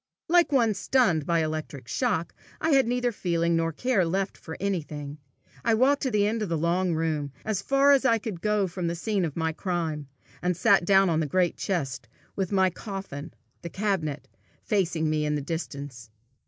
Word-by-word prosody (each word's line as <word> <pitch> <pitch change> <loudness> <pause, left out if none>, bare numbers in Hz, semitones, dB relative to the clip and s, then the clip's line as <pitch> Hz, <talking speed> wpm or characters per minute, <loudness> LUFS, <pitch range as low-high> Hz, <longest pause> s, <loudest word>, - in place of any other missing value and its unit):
Like 345 -1 +4
one 235 -6 +3
stunned 190 - +2
by 170 - +2
an 160 - +2
electric 155 -5 -5
shock, 195 - -1 0.3
I 320 - +1
had 270 -4 +4
neither 245 0 +1
feeling 170 -4 0
nor 165 0 +1
care 230 +3 +1
left 190 +3 -1
for 160 - -9
anything. 150 -6 -3 0.4
I 230 -1 +3
walked 270 +5 +3
to 265 - 0
the 210 -3 +2
end 220 +2 0
of 210 - -2
the 165 - 0
long 170 +2 +1
room, 155 -3 -1
as 215 -3 -1
far 275 +4 +4
as 275 -1 +5
I 230 -4 +4
could 210 -6 -6
go 210 -2 +2
from 180 -1 -3
the 170 - -1
scene 195 +1 0
of 155 - -5
my 160 -1 0
crime, 160 -5 -3 0.3
and 180 0 0
sat 175 - +4
down 195 -1 +5
on 160 - +2
the 155 - 0
great 180 +3 +1
chest, 140 -9 -3 0.3
with 190 -1 -2
my 190 -2 +3
coffin, 190 -7 -7 0.3
the 170 - -6
cabinet, 170 -8 -2 0.4
facing 170 -6 0
me 155 0 0
in 150 0 0
the - - 0
distance. 140 -5 -6
175 Hz, 195 wpm, -27 LUFS, 160-210 Hz, 0.4 s, as